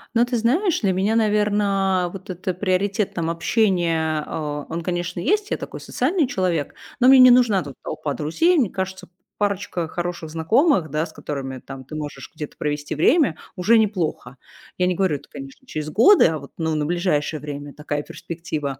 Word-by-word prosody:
Ну 235 Hz, +1 st, +5 dB
ты 245 Hz, 0 st, -2 dB
знаешь, 310 Hz, -, +1 dB
для 195 Hz, -3 st, +2 dB
меня, 195 Hz, +4 st, +1 dB
наверно, 205 Hz, -4 st, +2 dB
вот 190 Hz, -1 st, -10 dB
это 185 Hz, +1 st, -3 dB
приоритет, 195 Hz, +2 st, 0 dB
там, 165 Hz, -1 st, -2 dB
общения, 165 Hz, -4 st, +1 dB
э, 150 Hz, -2 st, -4 dB
он, 165 Hz, +1 st, -4 dB
конечно, 175 Hz, 0 st, -3 dB
есть. 415 Hz, -, 0 dB
Я -, -, +1 dB
такой -, -, -7 dB
социальный 295 Hz, +2 st, 0 dB
человек, 180 Hz, -, -1 dB, 0.3 s
но 250 Hz, -, +5 dB
мне 265 Hz, 0 st, +8 dB
не 255 Hz, -1 st, +9 dB
нужна 230 Hz, -7 st, +4 dB
тут 140 Hz, -2 st, -9 dB
толпа 155 Hz, -2 st, -4 dB
друзей. 325 Hz, -, +2 dB
Мне 235 Hz, -10 st, +2 dB
кажется, 190 Hz, -1 st, -5 dB, 0.3 s
парочка 200 Hz, -4 st, -1 dB
хороших 175 Hz, -1 st, -4 dB
знакомых, 180 Hz, -, +2 dB
да, 155 Hz, +2 st, 0 dB
с 160 Hz, -, -13 dB
которыми, 135 Hz, -3 st, -5 dB
там, 135 Hz, 0 st, -10 dB
ты 155 Hz, -, -9 dB
можешь 145 Hz, -3 st, -6 dB
где-то 150 Hz, -2 st, -7 dB
провести 145 Hz, 0 st, -3 dB
время- 245 Hz, -, +3 dB, 0.2 s
уже 220 Hz, +6 st, +4 dB
неплохо. 180 Hz, -, -1 dB, 0.4 s
Я 180 Hz, -, +2 dB
не 180 Hz, -, +1 dB
говорю 185 Hz, -5 st, +1 dB
это, -, -, -10 dB
конечно, 135 Hz, -, -11 dB
через 155 Hz, -8 st, -5 dB
годы, 245 Hz, -, +6 dB
а 160 Hz, -2 st, -2 dB
вот, 140 Hz, -, -12 dB
ну, 160 Hz, -2 st, -1 dB
на 150 Hz, -1 st, 0 dB
ближайшее 160 Hz, -3 st, 0 dB
время 145 Hz, 0 st, -7 dB
такая 145 Hz, -1 st, -4 dB
перспектива. 155 Hz, -5 st, -5 dB
175 Hz, 180 wpm, -22 LUFS, 155-210 Hz, 0.4 s, не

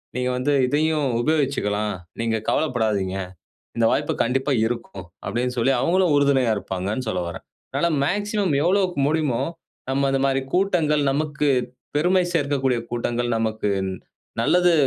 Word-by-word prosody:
நீங்க 125 Hz, 0 st, 0 dB
வந்து 140 Hz, +3 st, 0 dB, 0.2 s
இதையும் 150 Hz, +1 st, +1 dB
உபயோகிச்சுக்கலாம். 120 Hz, -8 st, 0 dB, 0.3 s
நீங்க 115 Hz, -1 st, 0 dB
கவலைப்படாதீங்க. 110 Hz, -9 st, 0 dB, 0.6 s
இந்த 115 Hz, -, +3 dB
வாய்ப்பு -, -, 0 dB
கண்டிப்பா 135 Hz, +4 st, 0 dB
இருக்கும். 115 Hz, -6 st, -5 dB, 0.2 s
அப்பிடின்னு 120 Hz, +5 st, -1 dB
சொல்லி 130 Hz, +4 st, +3 dB
அவுங்களும் 180 Hz, 0 st, +2 dB
உறுதுணையா 140 Hz, -4 st, +3 dB
இருப்பாங்கன்னு 100 Hz, +5 st, -3 dB
சொல்ல 90 Hz, -, -1 dB
வரேன். 85 Hz, -, -8 dB, 0.3 s
அதனால 170 Hz, -, +1 dB, 0.2 s
மேக்ஸிமம் 205 Hz, 0 st, 0 dB
எவ்வளோக்கு 185 Hz, -2 st, +1 dB
முடியுமோ, 150 Hz, -6 st, 0 dB, 0.5 s
நம்ம 135 Hz, +1 st, +1 dB
அந்தமாரி 135 Hz, 0 st, +1 dB
கூட்டங்கள், 165 Hz, -6 st, +2 dB
நமக்கு 150 Hz, 0 st, 0 dB, 0.5 s
பெருமை 180 Hz, +4 st, +3 dB
சேர்க்கக்கூடிய 140 Hz, -4 st, +1 dB
கூட்டங்கள், 120 Hz, 0 st, -1 dB
நமக்கு 110 Hz, -2 st, -1 dB, 0.7 s
நல்லது 180 Hz, -1 st, +4 dB
135 Hz, 120 wpm, -23 LUFS, 115-155 Hz, 0.7 s, நல்லது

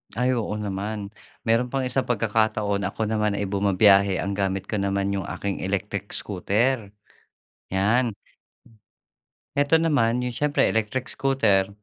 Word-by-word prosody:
Ay, 125 Hz, +2 st, +1 dB
oo 115 Hz, -3 st, -2 dB
naman. 100 Hz, 0 st, -4 dB, 0.4 s
Meron 120 Hz, +2 st, +2 dB
pang 135 Hz, -1 st, 0 dB
isang 130 Hz, +1 st, 0 dB
pagkakataon. 110 Hz, -3 st, 0 dB
Ako 110 Hz, 0 st, -2 dB
naman 105 Hz, -1 st, 0 dB
ay 100 Hz, -, -1 dB
bumabiyahe, 100 Hz, 0 st, +4 dB
ang 100 Hz, 0 st, -2 dB
gamit 95 Hz, -1 st, -1 dB
ko -, -, -3 dB
naman 100 Hz, 0 st, 0 dB
yung 95 Hz, -, -2 dB
aking 100 Hz, -1 st, -4 dB
electric 100 Hz, +1 st, -3 dB
scooter, 105 Hz, +3 st, 0 dB, 0.8 s
'yan. 110 Hz, +6 st, +2 dB, 1.4 s
Eto 145 Hz, +2 st, +4 dB
naman, 140 Hz, -8 st, +2 dB
'yung 125 Hz, -, -3 dB
siyempre, 150 Hz, +3 st, +1 dB
electric 110 Hz, +4 st, -1 dB
scooter, 110 Hz, -8 st, +1 dB
105 Hz, 130 wpm, -24 LUFS, 100-120 Hz, 1.4 s, bumabiyahe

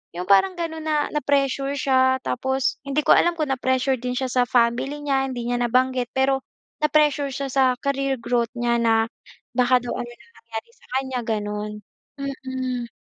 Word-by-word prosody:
'yong 180 Hz, +1 st, -4 dB
parang 365 Hz, -, +5 dB
gano'n 320 Hz, -2 st, -4 dB
na 310 Hz, -1 st, 0 dB, 0.2 s
na-pressure 275 Hz, -1 st, +1 dB
siya 260 Hz, -1 st, +3 dB
tapos 265 Hz, +1 st, -1 dB
hindi 280 Hz, +2 st, +1 dB
ko -, -, +5 dB
alam 345 Hz, -, +4 dB
kung 305 Hz, -3 st, -1 dB
na-pressure 260 Hz, 0 st, +1 dB
din 250 Hz, +1 st, -3 dB
siya 260 Hz, -1 st, -1 dB
sa 250 Hz, 0 st, +3 dB
family 245 Hz, +5 st, +1 dB
niya, 270 Hz, -2 st, +1 dB
hindi 245 Hz, -2 st, -4 dB
niya 245 Hz, 0 st, 0 dB
nabanggit 255 Hz, 0 st, +1 dB
pero 265 Hz, 0 st, +2 dB, 0.4 s
na-pressure 300 Hz, -1 st, +3 dB
siya 275 Hz, +1 st, -3 dB
sa 270 Hz, +1 st, +3 dB, 0.2 s
career 275 Hz, -1 st, 0 dB
growth 235 Hz, -1 st, 0 dB
niya 240 Hz, 0 st, +1 dB
na 225 Hz, -1 st, +3 dB, 0.5 s
baka 250 Hz, 0 st, +4 dB
daw 245 Hz, -, -4 dB
ano 240 Hz, -, -4 dB
na 240 Hz, -, -17 dB
mangyari 230 Hz, 0 st, -7 dB
sa -, -, -24 dB
kanya 265 Hz, -1 st, -1 dB
gano'n. 210 Hz, -1 st, -2 dB, 0.5 s
Mm. 260 Hz, -3 st, -4 dB
260 Hz, 170 wpm, -23 LUFS, 240-275 Hz, 0.5 s, parang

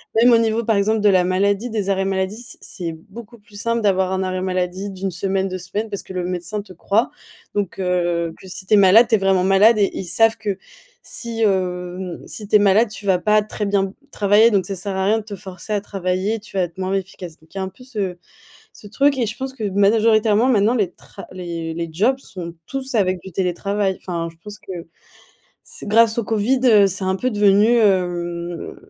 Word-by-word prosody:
même 240 Hz, +2 st, +6 dB
au 230 Hz, -, +7 dB
niveau 225 Hz, 0 st, +1 dB
par 225 Hz, -, +2 dB
exemple 215 Hz, +2 st, +2 dB
de 210 Hz, -, +5 dB
la 185 Hz, -2 st, +4 dB
maladie, 200 Hz, +5 st, 0 dB
des 210 Hz, -3 st, -2 dB
arrêts 195 Hz, -1 st, +1 dB
maladie, 195 Hz, +3 st, -2 dB
c'est 240 Hz, -, -9 dB
c'est 170 Hz, -3 st, -5 dB, 0.2 s
beaucoup 235 Hz, 0 st, -11 dB
plus 205 Hz, 0 st, -20 dB
simple 230 Hz, 0 st, 0 dB
d'avoir 190 Hz, -3 st, +1 dB
un 190 Hz, 0 st, -1 dB
arrêt 185 Hz, 0 st, -2 dB
maladie 185 Hz, +1 st, -2 dB
d' 190 Hz, -, -10 dB
1 195 Hz, -1 st, -2 dB
semaine, 190 Hz, +2 st, -1 dB
2 185 Hz, -, -4 dB
semaines 205 Hz, +5 st, -4 dB
parce 200 Hz, -2 st, -5 dB
que -, -, -12 dB
le 180 Hz, -1 st, -2 dB
médecin 180 Hz, +3 st, -3 dB
te 195 Hz, -2 st, -14 dB
croit. 205 Hz, +6 st, 0 dB, 0.4 s
Donc, 200 Hz, -2 st, -2 dB
heu, 175 Hz, -2 st, 0 dB
que 190 Hz, -, -14 dB
si 190 Hz, -, -7 dB
tu 215 Hz, -, 0 dB
es -, -, +8 dB
malade 200 Hz, +4 st, +7 dB
tu 225 Hz, -, +3 dB
es -, -, +3 dB
vraiment 195 Hz, -1 st, +2 dB
malade 200 Hz, +4 st, +5 dB
et 200 Hz, -2 st, +3 dB
ils -, -, -3 dB
savent 225 Hz, +5 st, +3 dB
que 205 Hz, -3 st, -3 dB, 0.5 s
si, 230 Hz, -1 st, -4 dB
hem, 180 Hz, -2 st, -1 dB
si 210 Hz, -2 st, -7 dB
tu 215 Hz, -, +1 dB
es 210 Hz, -, +8 dB
malade 205 Hz, +3 st, +4 dB
tu 210 Hz, 0 st, -9 dB
vas 190 Hz, -2 st, +3 dB
pas 210 Hz, +4 st, +3 dB
très 215 Hz, 0 st, -4 dB
bien 200 Hz, -1 st, +1 dB
b 190 Hz, -, -7 dB, 0.2 s
travailler 210 Hz, +3 st, +4 dB
donc 195 Hz, -3 st, +2 dB
ça 195 Hz, -, -4 dB
sert 190 Hz, +2 st, -3 dB
à 190 Hz, 0 st, 0 dB
rien 215 Hz, +3 st, +3 dB
de 215 Hz, -, -8 dB
te 205 Hz, -1 st, -7 dB
forcer 190 Hz, +2 st, -9 dB
à 205 Hz, -, 0 dB
travailler, 195 Hz, +2 st, -2 dB
tu 205 Hz, -1 st, -9 dB
vas 185 Hz, -, +3 dB
être 170 Hz, 0 st, -6 dB
moins 190 Hz, 0 st, -2 dB
efficace. 185 Hz, -3 st, -6 dB
Donc 160 Hz, +1 st, -24 dB
il -, -, -8 dB
y -, -, -2 dB
a -, -, -1 dB
un 190 Hz, -, -4 dB
peu 195 Hz, +7 st, -17 dB
ce 205 Hz, -8 st, -4 dB, 0.6 s
ce 205 Hz, -, -13 dB
truc 275 Hz, +6 st, +2 dB
et 245 Hz, -, +1 dB
je 215 Hz, +1 st, -5 dB
pense 265 Hz, 0 st, -5 dB
que 225 Hz, -5 st, -5 dB
majoritairement 215 Hz, +3 st, +3 dB
maintenant 225 Hz, -1 st, +3 dB
les 200 Hz, -7 st, 0 dB
tra -, -, -13 dB
les 170 Hz, -3 st, -5 dB
les 170 Hz, 0 st, -4 dB
jobs 230 Hz, +11 st, +1 dB
sont 175 Hz, -9 st, -8 dB
tous 270 Hz, -1 st, -4 dB
avec 185 Hz, -4 st, +1 dB
du 190 Hz, -, -10 dB
télétravail. 190 Hz, +2 st, -1 dB
Enfin, 170 Hz, -2 st, -4 dB
je 165 Hz, -, -25 dB
pense 210 Hz, 0 st, -9 dB
que -, -, -10 dB, 0.9 s
c'est -, -, -10 dB
grâce 225 Hz, +1 st, +4 dB
au 235 Hz, -, +1 dB
Covid, 225 Hz, +5 st, +1 dB
heu, 210 Hz, -5 st, +6 dB
c'est 190 Hz, +1 st, -1 dB
un 190 Hz, 0 st, +1 dB
peu 255 Hz, +6 st, -1 dB
devenu, 205 Hz, 0 st, +4 dB
hem, 175 Hz, -4 st, -1 dB
195 Hz, 235 wpm, -20 LUFS, 185-215 Hz, 0.9 s, es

